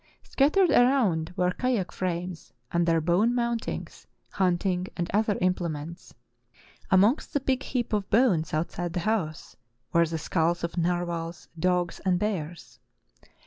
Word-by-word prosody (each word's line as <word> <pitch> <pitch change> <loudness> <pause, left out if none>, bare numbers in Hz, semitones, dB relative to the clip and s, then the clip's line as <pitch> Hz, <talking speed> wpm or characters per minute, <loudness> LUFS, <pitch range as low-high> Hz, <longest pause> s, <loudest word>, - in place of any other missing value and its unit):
Scattered 320 +6 +3
around 220 -11 +3
were 180 0 +2
kayak 235 -3 -1
frames 180 -1 -4 0.2
and 170 0 +1
their 165 -1 +3
bone 180 +9 +2
mountings, 235 -2 -3 0.2
hunting 180 -1 0
and 175 -1 -2
other 210 -1 +2
implements. 170 -3 -2 0.8
Amongst 200 +9 +3
the 285 - +2
big 265 -1 0
heap 245 -4 -3
of 205 -2 -1
bones 200 - +3
outside 170 +2 -2
the 175 - -1
house 175 -6 -2 0.4
were 170 0 +4
the 165 +1 -3
skulls 170 +1 0
of 170 - -3
narwhals, 170 -1 -2
dogs, 180 0 0
and 185 -2 +2
bears. 175 -5 -4
180 Hz, 135 wpm, -27 LUFS, 170-215 Hz, 0.8 s, were